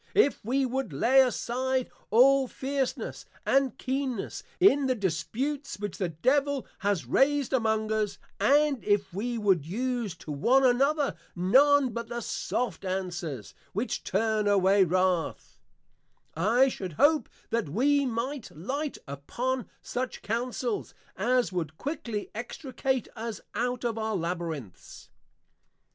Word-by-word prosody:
If 345 -10 +3
we 265 +5 +1
would 260 -4 -2
lay 250 - +5
aside 255 0 0 0.2
all 265 +4 +5
fierceness, 270 +1 -3 0.2
and 270 -1 +2
keenness, 260 -4 -3 0.2
in 285 -8 +5
the 255 - +2
disputes 240 - -2
which 205 -1 -5
the 185 -3 0
Devil 275 - +1
has 200 -3 0
raised 280 -1 +2
among 220 -3 +1
us; 215 -2 0 0.2
and 280 +4 +3
if 205 -3 +1
we 235 +5 -2
would 195 -8 +2
use 230 - -2
to 160 -2 -9
one 250 - +3
another 275 +4 +2 0.2
none 265 +9 +5
but 235 -1 -4
the 235 0 -4
soft 225 -8 -2
Answers, 175 - -4 0.2
which 220 +6 -2
turn 215 +1 +1
away 195 0 +5
wrath: 185 - 0 0.8
I 225 +11 +4
should 190 -9 -4
hope 300 - +3 0.2
that 230 -9 0
we 280 - +3
might 250 +1 -3
light 275 - -4
upon 235 - -3
such 255 +1 -4
Counsels, 235 +1 -2 0.2
as 245 +3 +1
would 160 -4 -3
quickly 240 -8 -4
Extricate 255 +2 -3
us 230 -1 -5
out 245 +2 -1
of 230 -1 -1
our 220 -1 -1
Labyrinths. 165 - -5
235 Hz, 125 wpm, -28 LUFS, 195-265 Hz, 0.8 s, lay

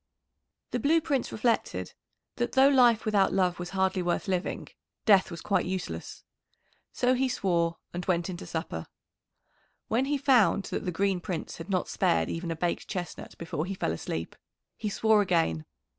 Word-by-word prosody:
"] - - -54
The - - -1
Blue 315 +3 +4
Prince 280 -5 -1
reflected 230 +1 -1 0.4
that 240 - -1
though 270 +1 +6
life 245 -5 +5
without 205 -3 +3
love 180 -2 +1
was 175 0 -5
hardly 190 -1 +1
worth 175 +2 -1
living, 185 -1 -2 0.4
death 200 -4 +5
was 170 -2 -7
quite 200 - +1
useless. 180 - -5 0.7
So 250 +1 +2
he 260 +1 +1
swore 170 -6 0 0.2
and 175 +1 -3
went 175 -2 +1
in 185 - -4
to - - -9
supper. 160 - -4 1.0
When 240 +4 +2
he 290 +1 0
found 240 - +4
that - - -2
the 180 - -1
Green 190 +1 +1
Prince 175 -2 -4
had 165 +4 -8
not 185 -2 0
spared 80 -1 +1
even 170 +1 -4
a 165 - -1
baked 170 +2 -2
chestnut 180 -3 -6
before 165 0 -3
he 195 - -3
fell 80 - -1
asleep, 80 0 -4 0.4
he 215 - -3
swore 220 +1 +3
again. 165 - +1
190 Hz, 175 wpm, -28 LUFS, 170-220 Hz, 1.0 s, though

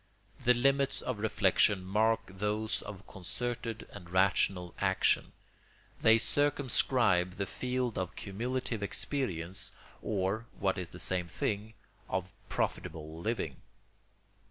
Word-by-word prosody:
The 125 +1 +4
limits 135 +2 +2
of 125 -5 -2
reflection 100 -2 +3
mark 110 +4 +3
those 105 +3 -1
of 100 -2 -8
concerted 115 +4 -4
and 90 -4 -10
rational 95 -1 +2
action; 95 -1 +2 0.7
they 110 0 +7
circumscribe 120 -9 +2
the 100 - -1
field 125 +1 -2
of 90 -2 -3
cumulative 115 +2 -2
experience, 100 - -1 0.3
or, 105 +2 -1
what 95 0 +1
is 90 -2 -4
the 90 - -10
same 90 -2 0
thing, 105 +5 -2 0.3
of 95 0 -2 0.2
profitable 80 0 -2
living. 85 - -2
100 Hz, 110 wpm, -32 LUFS, 95-115 Hz, 0.7 s, they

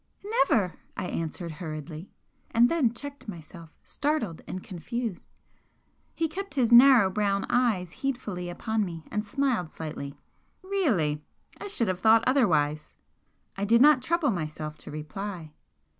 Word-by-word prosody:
"Never!" 270 - +2 0.2
I - - -2
answered, 165 0 -4
hurriedly, 155 +1 -7 0.4
and 235 +1 +4
then 300 -9 +2
checked 285 +3 -8
myself, 170 -3 -9
startled 280 - -2
and 185 - -5
confused. 215 +3 -5 0.9
He 330 - +1
kept 390 +4 -6
his 245 -4 +2
narrow 240 -5 +8
brown 200 0 0
eyes 215 -9 +1
heedfully 210 -10 -3
upon 220 +4 -1
me 165 -4 -6
and 210 0 -1
smiled 225 - 0
slightly. 150 -3 -7 0.5
"Really! 215 - 0 0.4
I 410 - -6
should 245 - 0
have 185 -1 -1
thought 220 +3 +5
otherwise!" 160 - +2 0.6
I 195 - -3
did 230 +3 +4
not 290 0 +7
trouble 315 0 +1
myself 155 -4 -4
to - - -11
reply. 160 +2 -6
205 Hz, 135 wpm, -27 LUFS, 165-255 Hz, 0.9 s, narrow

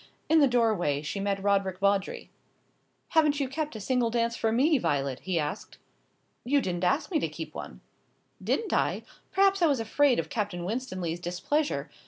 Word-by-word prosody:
In 320 +1 +6
the 285 - +6
doorway 215 - +1
she 175 +6 -4
met 195 0 -1
Roderick 195 -2 +1
Vawdrey. 200 0 0 0.8
"Haven't 300 -2 +3
you 275 - 0
kept 300 0 -4
a - - -5
single 245 +2 +1
dance 235 0 0
for 225 - 0
me, 280 +6 +3
Violet?" 140 - -1
he 185 -2 -2
asked. 150 +5 -4 0.7
"You 285 +3 +2
didn't 180 -7 -3
ask 285 - +1
me 320 - +2
to - - -1
keep - - -7
one." - - -8 0.6
"Didn't 445 - -1
I? - - +1 0.3
Perhaps 390 0 +3
I 340 - +5
was 280 -5 +1
afraid 250 +3 +2
of - - -1
Captain 205 -9 -3
Winstanley's 185 -7 -3
displeasure. 185 - -2
225 Hz, 175 wpm, -28 LUFS, 185-285 Hz, 0.8 s, In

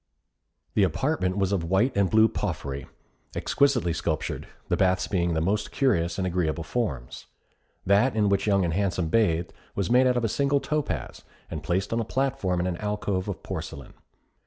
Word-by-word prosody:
The - - +2
apartment 95 - +1
was 95 -1 +1
of 95 -4 0
white 105 +8 +2
and 100 -2 +3
blue 110 0 +6
porphyry, 75 - -4 0.5
exquisitely 125 -12 +2
sculptured; 80 -1 -2 0.2
the - - +1
baths 95 -1 +2
being 85 -3 0
of 85 - 0
the 80 - +1
most 105 +5 0
curious 90 - +1
and 95 - -1
agreeable 85 -3 -1
forms. 80 - -3 0.6
That 105 +6 +3
in 105 -2 +3
which 100 +1 +1
Young 100 -3 +3
and 85 - -1
Handsome 90 -3 0
bathed, 85 -5 +1 0.2
was 100 0 -1
made 130 +1 +5
out 125 -1 +2
of 120 - +1
a - - +3
single 140 +5 +1
topaz, 150 +1 -3 0.3
and 80 - -4
placed 90 +8 -1
on 115 - +1
a - - 0
platform 110 -7 -1
in 90 - 0
an 90 -2 -2
alcove 105 -2 -2
of 95 -6 -5
porcelain. 80 -7 -6
95 Hz, 180 wpm, -26 LUFS, 85-110 Hz, 0.6 s, blue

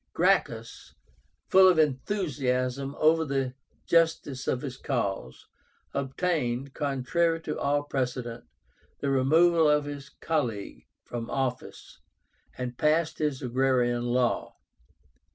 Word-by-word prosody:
Gracchus, 145 -11 0 0.5
full 190 0 +7
of 180 -3 +5
enthusiasm 135 -4 0
over 160 +1 +4
the 135 -3 -1 0.3
justice 160 -6 +1
of 125 - -1
his 130 -3 -5
cause, 100 - -3 0.5
obtained, 135 -2 -1
contrary 150 +4 0
to 155 -1 -4
all 145 +1 +1
precedent, 125 -4 -3 0.5
the 140 - -1
removal 160 +4 +4
of 150 0 +3
his 145 -1 -7
colleague 120 -11 -3 0.2
from 120 -1 -6
office, 130 -2 -4 0.6
and 125 -1 -5
passed 155 +2 +1
his 150 -4 -1
Agrarian 125 -1 +1
Law. 120 0 0
135 Hz, 105 wpm, -27 LUFS, 125-155 Hz, 0.6 s, full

